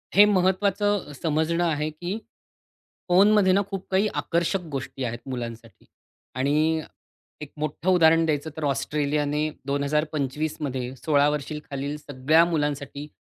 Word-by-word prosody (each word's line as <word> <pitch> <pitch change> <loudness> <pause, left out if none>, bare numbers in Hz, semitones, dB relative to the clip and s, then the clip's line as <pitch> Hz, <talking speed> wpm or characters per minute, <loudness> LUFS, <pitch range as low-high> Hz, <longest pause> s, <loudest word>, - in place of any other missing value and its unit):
हे 205 +2 +9
महत्त्वाचं 200 -2 +1
समजणं 160 +2 +1
आहे, 155 -2 0
की 175 +6 -5 0.9
फोनमध्ये 195 +1 +5
ना 200 - +4
खूप 195 -2 -5
काही 190 +3 +3
आकर्षक 170 +3 0
गोष्टी 135 -1 -5
आहेत 120 -1 -3
मुलांसाठी 115 -5 -7 0.5
आणि 155 +4 +1 0.6
एक 150 - -8
मोठं 155 +4 -2
उदाहरण 165 -2 +5
द्यायचं 155 -1 -1
तर 160 - -4
ऑस्ट्रेलियाने 145 +2 0 0.2
2025 150 +1 -1
मध्ये 130 -3 -3
16 145 +1 +3
वर्षांखालील 145 -1 -4
सगळ्या 150 +2 +2
मुलांसाठी 145 -3 -2
150 Hz, 120 wpm, -25 LUFS, 140-175 Hz, 0.9 s, हे